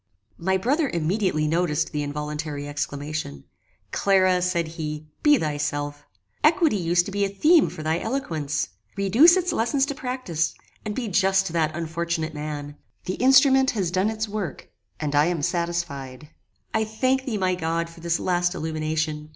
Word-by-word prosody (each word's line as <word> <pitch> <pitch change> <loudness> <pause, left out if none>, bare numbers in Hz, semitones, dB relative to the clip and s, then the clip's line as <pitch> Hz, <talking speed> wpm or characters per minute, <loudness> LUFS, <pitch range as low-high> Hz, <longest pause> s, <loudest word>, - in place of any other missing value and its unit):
My 190 +2 +1
brother 275 - +1
immediately 170 -1 0
noticed 160 -1 0
the 150 - -2
involuntary 150 0 -4
exclamation: 145 - -4 0.5
"Clara!" 185 -2 +3
said 175 -2 0
he, 155 -2 -5 0.2
"be 295 -1 +6
thyself. 145 -3 -3 0.4
Equity 320 - +4
used 175 -1 +2
to 200 - -6
be 200 +1 0
a 200 - +1
theme 305 - +4
for 155 - -8
thy 160 +2 0
eloquence. 155 - -2 0.3
Reduce 240 - +6
its 360 -1 0
lessons 265 +4 +1
to 285 - -3
practice, 250 - -2 0.3
and 210 -1 -4
be 245 -3 -2
just 195 0 +3
to 170 - -4
that 155 -2 +1
unfortunate 165 -1 -2
man. 150 -1 -6 0.3
The 185 - -2
instrument 265 +1 +6
has 180 -4 0
done 190 +3 +1
its 220 0 -3
work, 205 -8 -5 0.3
and 150 -2 -2
I 145 +1 +4
am 170 -4 -1
satisfied. 170 -6 -3 0.4
"I 220 - +2
thank 255 +5 0
thee, 230 -5 -2
my 185 -2 +1
God, 165 -1 -1
for 165 0 -14
this 170 0 0
last 175 0 0
illumination! 155 -1 -2
170 Hz, 160 wpm, -24 LUFS, 155-210 Hz, 0.5 s, be